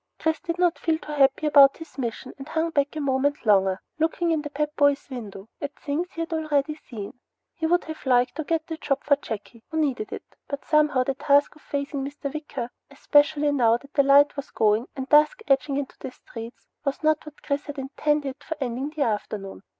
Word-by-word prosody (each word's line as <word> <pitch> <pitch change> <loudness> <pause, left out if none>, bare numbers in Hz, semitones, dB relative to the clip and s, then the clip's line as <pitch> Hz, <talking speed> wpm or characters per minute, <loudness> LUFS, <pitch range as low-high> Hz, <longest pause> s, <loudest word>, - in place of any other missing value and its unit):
Chris 320 -1 0
did 340 -1 -4
not 355 -1 +2
feel 325 -2 +1
too 305 - -9
happy 280 0 +3
about 280 -2 +7
his 325 -1 -11
mission 245 +1 -4
and 270 +3 -9
hung 325 +1 0
back 285 0 0
a - - -2
moment 280 0 0
longer, 195 -2 +4 0.2
looking 330 +2 +1
in 315 -2 +1
the 295 - -6
Pep 300 +1 -2
Boys' 285 -1 +3
window 210 -5 -7
at 285 -1 -4
things 320 +5 -3
he 330 - -4
had 330 0 -3
already 305 -2 0
seen. 235 -7 -9 0.3
He 320 -2 -2
would 350 +2 +3
have 315 0 -8
liked 250 0 +3
to 315 - -1
get 320 +1 -1
the 325 -1 -5
job 285 -3 -1
for 285 - +4
Jakey, 225 -2 -8
who 320 - -4
needed 305 +6 0
it, - - -6 0.2
but 280 -1 -5
somehow 300 -4 +3
the 275 - -1
task 285 +2 +3
of 305 - -19
facing 280 -1 -3
Mr. 280 0 -5
Wicker, 275 -5 -5 0.2
especially 290 +1 +3
now 235 -5 +4
that 280 +3 -18
the 285 - +5
light 280 +1 +5
was 280 -2 -6
going 215 +2 +2
and 265 -1 -4
dusk 300 - +5
edging 275 +1 +2
into 280 -2 -4
the - - -5
streets, 230 -1 -10 0.2
was 275 +2 -2
not 310 0 +2
what 305 - -12
Chris 285 0 -2
had 290 0 -6
intended 280 0 -1
for 320 - -5
ending 260 +1 -2
the 305 -1 -1
afternoon. 205 -3 -3
285 Hz, 215 wpm, -25 LUFS, 265-305 Hz, 0.3 s, about